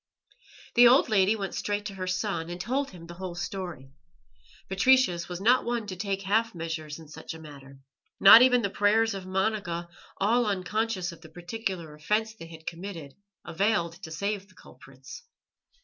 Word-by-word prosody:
The 240 0 +8
old 250 +1 +5
lady 205 0 +3
went 195 -3 -4
straight 205 0 -2
to 200 - -5
her 185 -1 -5
son, 185 -3 -2
and 175 +1 -6
told 260 +8 -1
him 175 -3 -12
the 170 - -10
whole 180 0 -7
story. 175 -7 -6 0.8
Patricius 195 -4 +3
was 175 0 -5
not 240 +6 +4
one 235 -2 -2
to 190 -3 -6
take 195 +1 -3
half 220 +2 +1
measures 160 -2 -5
in 160 -2 -13
such 160 +2 -8
a - - -10
matter. 140 -3 -12 0.4
Not 200 +4 +10
even 250 -1 +5
the 200 - -1
prayers 220 +2 +2
of 190 -1 -7
Monica, 185 -3 -2 0.3
all 230 +4 +2
unconscious 200 -1 -1
of 170 - -14
the 160 - -13
particular 175 -1 -5
offence 210 +9 -1
they 165 -7 -11
had 160 -1 -13
committed, 165 -5 -7 0.3
availed 170 0 0
to 170 - -8
save 200 +4 -3
the 185 - -23
culprits. 135 - -13
190 Hz, 175 wpm, -27 LUFS, 165-215 Hz, 0.8 s, Not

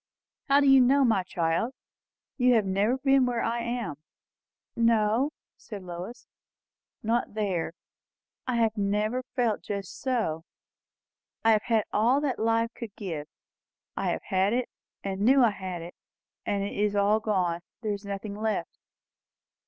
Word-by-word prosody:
"How 280 +1 +6
do 280 - +3
you 270 -1 +8
know, 270 +2 +5
my 220 -5 +3
child? 180 +7 -1 0.6
You 250 -2 +4
have 215 -3 +3
never 200 +6 +1
been 270 -1 +3
where 240 -2 -1
I 235 +1 0
am." 235 - -3 0.8
"No," 230 +3 +3 0.3
said 205 -5 -9
Lois, 180 +6 -7 0.8
"not 230 0 0
there. 190 -6 -1 0.7
I 250 - 0
have 225 -2 +2
never 210 +4 0
felt 240 -5 +1
just 200 -2 -5
so." 220 - -1 1.0
"I 225 - +7
have 215 -1 +4
had 225 -3 +2
all 235 +6 +3
that 280 -4 -1
life 230 +1 +1
could 225 -4 -8
give. 165 -8 -5 0.7
I - - -1
have - - -2
had 190 +1 +1
it, 250 0 0 0.3
and 195 0 -3
knew 260 +4 +5
I 230 - +5
had 185 -4 -6
it. 175 - -9 0.5
And 200 -1 0
it 200 - -4
is 205 0 +1
all 205 +2 +3
gone. 185 -6 0 0.2
There 215 -3 -1
is 200 0 -6
nothing 200 +1 -5
left." 215 0 -3
215 Hz, 150 wpm, -28 LUFS, 200-240 Hz, 1.0 s, you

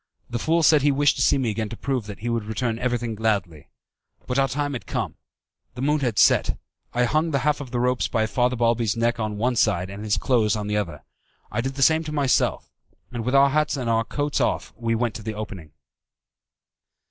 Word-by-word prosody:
The 120 - -2
fool 165 +6 +1
said 155 -2 +6
he 145 +1 +3
wished 145 +1 +2
to - - -1
see - - +4
me 125 -5 0
again 110 0 -3
to 115 - -7
prove 130 -6 -2
that 105 -1 -8
he 120 - -2
would 115 -2 -1
return 115 +1 -2
everything 120 -2 -1
gladly. 100 -8 -2 0.6
But 125 +2 -1
our 135 - +3
time 145 +2 -2
was 125 - -4
come. - - -2 0.6
The 125 - -4
moon 150 +2 +2
had 120 -7 -1
set. - - +4 0.3
I 125 - +1
hung 155 +6 +1
the 145 - +1
half 150 -1 +1
of 135 - -7
the 120 0 -2
ropes 125 +1 +1
by 110 -2 0
Father 125 +3 +1
Balbi's 115 -2 +1
neck 115 +1 +1
on 110 -1 -2
one 125 +3 0
side 95 -3 +1
and 100 +2 -7
his 105 -2 +1
clothes 115 -5 +2
on 105 -1 -3
the 105 0 -2
other. 85 -8 -3 0.5
I 110 - -1
did 135 +2 -4
the 135 - +1
same 160 +3 +4
to 155 - -5
myself, 140 -4 +1 0.4
and 120 -2 -4
with 125 +4 0
our 140 0 +6
hats 150 0 +1
on - - -3
and 115 -2 -1
our 115 0 +2
coats 145 +4 -2
off - - -1
we 115 0 -1
went 115 -1 0
to - - -10
the 110 0 -5
opening. 95 -7 -7
120 Hz, 230 wpm, -24 LUFS, 110-135 Hz, 0.6 s, said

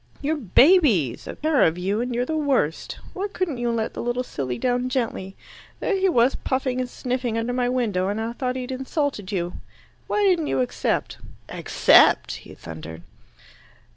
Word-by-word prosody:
"You're 300 +2 -1
babies, 245 - +4
a - - -6
pair 310 -2 +1
of 165 +2 +3
you, 195 +5 -1
and 245 0 -3
you're 245 +1 0
the 315 - -2
worst. 270 - 0 0.2
Why 395 +2 -2
couldn't 330 -11 -2
you 240 0 0
let 230 -1 -1
the - - -5
little 240 +1 -1
silly 130 - -4
down 250 0 0
gently? 225 -7 -3 0.4
There 410 - 0
he 385 0 +2
was 245 -4 +3
puffing 260 -1 -1
and 250 - -4
sniffing 245 -2 -2
under 230 +2 -1
my 245 -1 0
window, 215 -8 0
and 205 +2 -2
I 225 +1 -3
thought 250 +1 -2
he'd 255 0 -4
insulted 265 - -2
you. 175 -3 -2 0.5
Why 420 - +1
didn't 360 -6 +3
you 135 - 0
accept?" 125 - -2 0.3
"Accept?" - - +4
he - - -13
thundered. 80 +1 -9
245 Hz, 175 wpm, -23 LUFS, 200-270 Hz, 0.5 s, babies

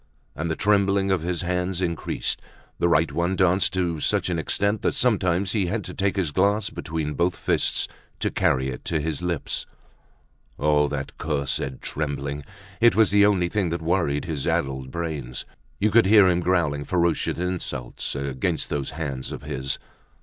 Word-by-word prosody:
And 80 +2 -2
the 80 - 0
trembling 100 -1 +2
of 95 -3 +2
his 85 +1 -2
hands 90 +1 -1
increased, 85 -3 -1 0.4
the 85 - +3
right 80 -2 +3
one 85 +5 0
danced 95 0 +3
to 85 -4 0
such - - +1
an 85 -2 0
extent, 100 +5 0
that - - 0
sometimes 95 -5 +2
he 100 -5 +1
had 105 +3 -1
to - - -7
take 100 0 0
his 90 -6 0
glass 100 +5 +2
between 80 -2 -3
both 85 +2 +1
fists - - +1 0.3
to - - 0
carry 65 0 +1
it 65 - -6
to 80 - 0
his 80 +1 -2
lips. 85 -3 -2 0.9
Oh! 75 0 +3
that 70 -1 -4
cursed 70 -3 -2
trembling! 70 -1 -3 0.4
It 120 0 +5
was 110 -3 +4
the 100 0 +6
only 95 -4 +2
thing 95 -1 0
that 85 0 -3
worried 80 -4 +1
his 80 -6 -3
addled 65 -1 -1
brains. 75 -6 -4 0.3
You 105 +1 +2
could 115 -3 +5
hear 105 -2 +7
him 90 -1 +3
growling 85 -5 +1
ferocious 85 +1 +1
insults 90 -11 -3
against 70 -2 -1
those 70 -2 -2
hands 70 -5 -4
of - - -7
his. 65 +1 -2
85 Hz, 170 wpm, -24 LUFS, 75-95 Hz, 0.9 s, hear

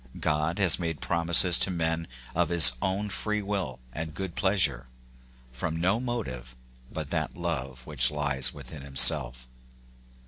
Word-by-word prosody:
God 75 +2 -1
has 95 -4 +3
made 80 -4 -4
promises 85 +2 +4
to - - +3
men 80 -2 -2 0.3
of 85 -1 0
his 85 -7 +9
own 95 +2 -2
free 105 +1 -3
will 95 -10 -4 0.2
and 80 +1 -7
good 95 -3 -6
pleasure, 90 -12 0 0.7
from 80 +6 -4
no 95 +6 0
motive 65 - -6 0.4
but - - -7
that - - -3
love 65 -7 -5
which 70 -5 +2
lies 70 -4 -1
within 70 0 -11
himself. 65 -2 0
80 Hz, 140 wpm, -26 LUFS, 65-90 Hz, 0.7 s, his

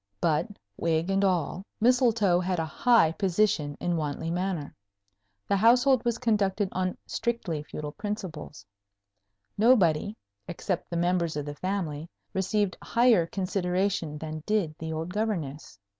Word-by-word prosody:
But, 160 - +1 0.3
wig 165 +2 0
and 195 +1 +2
all, 185 -1 0 0.2
Mistletoe 230 -6 +3
had 180 0 -1
a 165 - 0
high 225 0 +4
position 175 -5 0
in 175 -1 0
Wantley 155 +1 -3
Manor. 180 -4 -2 0.7
The 200 - +2
household 245 +4 +4
was 235 -1 0
conducted 205 -4 +1
on 185 0 -2
strictly 215 -10 -2
feudal 150 0 -6
principles. 185 - -6 0.9
Nobody, 205 -4 +3 0.3
except 175 +1 -3
the 170 - -2
members 170 -2 +1
of 145 - -3
the 145 - -5
family, 165 -2 -3 0.2
received 195 +1 0
higher 230 -8 +3
consideration 180 -3 -1
than 155 0 -6
did 205 -8 +1
the 160 0 -4
old 160 +3 -4
Governess. 165 - -3
180 Hz, 130 wpm, -27 LUFS, 160-210 Hz, 0.9 s, high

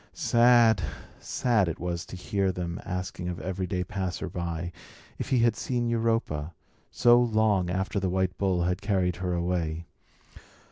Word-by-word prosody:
Sad, 120 -3 +5 0.4
sad 115 -7 +1
it 85 - -4
was 85 -1 -3
to - - -8
hear 95 +1 0
them 85 0 -4
asking 90 -1 -4
of 90 - -5
every 95 +2 -3 0.2
passerby 90 -3 -4 0.5
if - - -4
he 130 - +3
had 115 -2 +3
seen 120 +1 -1
Europa, 115 -10 -1 0.3
so 120 0 +5
long 110 -6 +2
after 95 +2 -1
the 95 -1 -1
white 95 0 0
bull 95 -3 +1
had 90 +1 -1
carried 95 -4 0
her 90 -1 -2
away. 85 -2 -1
95 Hz, 145 wpm, -27 LUFS, 90-110 Hz, 0.5 s, Sad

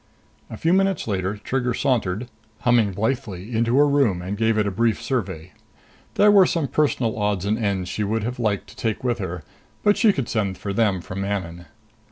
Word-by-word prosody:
A 110 - -7
few 165 +8 +1
minutes 195 -4 +1
later, 100 0 -1
Trigger 125 +2 -2
sauntered, 120 -4 0 0.3
humming 120 -4 +3
blithely, 110 -1 -3
into 115 +3 +2
her 145 +1 +6
room 135 -11 +2
and 95 +3 -4
gave 110 +1 +1
it 105 - +2
a 100 - -1
brief 115 +2 +1
survey. 95 - -3 0.6
There 210 0 +6
were 195 -3 +6
some 165 -5 0
personal 130 -7 0
odds 105 -2 0
and 105 +2 +1
ends 100 -4 -1
she 105 +4 -2
would 110 +2 -1
have 120 +2 -4
liked 105 -4 0
to - - -14
take 110 0 -2
with 120 -2 0
her, 90 -4 -5 0.4
but 205 0 +4
she 220 - +5
could 135 -10 -3
send 100 -5 -1
for 100 - -4
them 100 -4 +1
from 95 +2 -6
Manon. 90 -4 -4
110 Hz, 200 wpm, -23 LUFS, 100-125 Hz, 0.6 s, her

